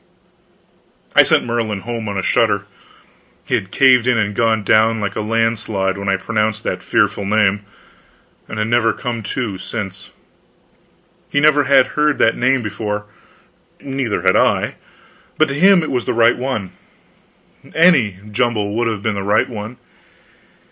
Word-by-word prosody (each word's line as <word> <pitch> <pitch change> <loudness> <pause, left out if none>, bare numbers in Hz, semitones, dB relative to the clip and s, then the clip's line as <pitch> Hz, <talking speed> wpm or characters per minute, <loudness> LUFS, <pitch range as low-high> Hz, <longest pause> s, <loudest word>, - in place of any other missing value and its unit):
I - - +9
sent - - +2
Merlin 115 -4 -2
home 115 -1 -5
on 100 - -4
a 95 - -2
shutter. 105 -4 +1 0.8
He - - -5
had 95 - -1
caved 125 0 +4
in 125 -2 +2
and 105 -1 -1
gone 110 -1 +1
down 110 +2 +3
like 100 -2 -3
a 110 - -2
landslide 110 -3 -1
when 100 0 -4
I 95 - +2
pronounced 110 +1 -2
that - - -3
fearful 100 - 0
name, 105 0 +1 0.8
and 110 - -7
had 105 0 -1
never 115 -1 +2
come 120 -2 -5
to 105 -3 -4
since. 100 -2 -7 1.2
He 145 - 0
never 145 -1 +4
had 135 -1 +4
heard 150 -1 +1
that 115 - +2
name 130 0 +1
before, 105 0 -4 0.7
neither 135 -5 -3
had - - +3
I - - +1 0.6
but 155 -1 +3
to - - -3
him 185 +4 +4
it 155 - -4
was 125 -2 -2
the - - -2
right 115 +1 +4
one. 120 -7 -4 1.0
Any 140 - +4
jumble 105 -2 -1
would 120 0 0
have 110 -3 -3
been 110 - 0
the 100 - -4
right 100 +1 +1
one. 110 +1 -8
115 Hz, 160 wpm, -18 LUFS, 105-125 Hz, 1.2 s, I